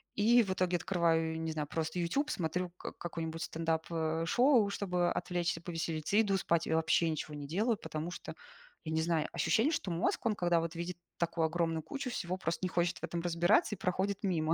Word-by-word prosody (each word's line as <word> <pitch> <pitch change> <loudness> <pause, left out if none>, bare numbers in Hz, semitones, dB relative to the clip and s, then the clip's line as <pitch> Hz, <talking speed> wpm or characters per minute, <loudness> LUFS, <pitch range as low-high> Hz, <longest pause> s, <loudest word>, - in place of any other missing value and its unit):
И 235 +3 +5
в 195 - -3
итоге, 180 -1 +1
открываю, 165 -3 +1
не 160 0 -2
знаю, 155 -2 -3
просто, 160 +3 -2
"Ютюб", 275 - 0
смотрю 175 - -1
к - - -6
какое-нибудь 165 -1 -5
стендап, 165 -1 -1
э, 160 0 0
шоу, 240 - +4
чтобы 180 -3 0
отвлечься, 175 -1 -1
повеселиться, 165 0 -2
и 220 - +7
иду 200 -3 +1
спать, 170 -3 +1
я 160 - +1
вообще 160 +1 +3
ничего 155 -1 -3
не 145 -1 -6
делаю, 215 - +1
потому, 155 -3 -4
что, - - -7 0.5
я 160 - -3
не 160 - +2
знаю, 160 -2 +1
ощущение, 220 - +2
что 195 - -2
мозг, 170 +7 0
он, 220 -2 +2
когда, 175 -3 +2
вот, 165 +1 -4
видит 170 +1 -4 0.2
такую 170 -1 +1
огромную 165 -1 0
кучу 275 - -4
всего, 185 -6 -3
просто 170 -3 -2
не 185 - +1
хочет 175 -1 0
в - - -30
этом 170 - -2
разбираться, 175 - +3
и - - -18
проходит 190 +2 -1
мимо. 165 -5 +1
170 Hz, 205 wpm, -33 LUFS, 160-190 Hz, 0.5 s, и